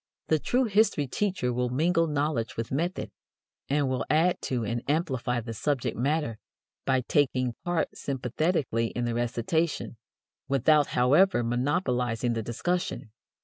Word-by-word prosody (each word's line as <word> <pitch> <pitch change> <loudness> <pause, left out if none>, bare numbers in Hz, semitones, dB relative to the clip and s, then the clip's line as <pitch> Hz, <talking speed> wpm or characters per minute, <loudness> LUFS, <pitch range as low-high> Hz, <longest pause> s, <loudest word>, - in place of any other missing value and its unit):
The 155 - +3
true 250 - +1
history 210 - +2
teacher 160 -4 -1
will 125 0 0
mingle 165 +6 +2
knowledge 145 -6 -1
with 115 0 -3
method, 170 +7 -2 0.6
and 145 0 +2
will 130 -3 -1
add 165 +4 +3
to 120 -4 -1
and 115 +2 -2
amplify 130 -6 0
the 115 0 -6
subject 135 +3 -1
matter 135 -3 -1 0.5
by 130 -1 +3
taking 130 -2 +1
part 175 -2 -1
sympathetically 130 -2 -1
in 120 +1 -3
the 120 - -1
recitation, 120 +4 -1 0.5
without, 140 +2 +4
however, 135 +4 +4
monopolizing 125 -2 0
the 115 - -2
discussion. 120 +2 -2
135 Hz, 135 wpm, -27 LUFS, 120-160 Hz, 0.6 s, without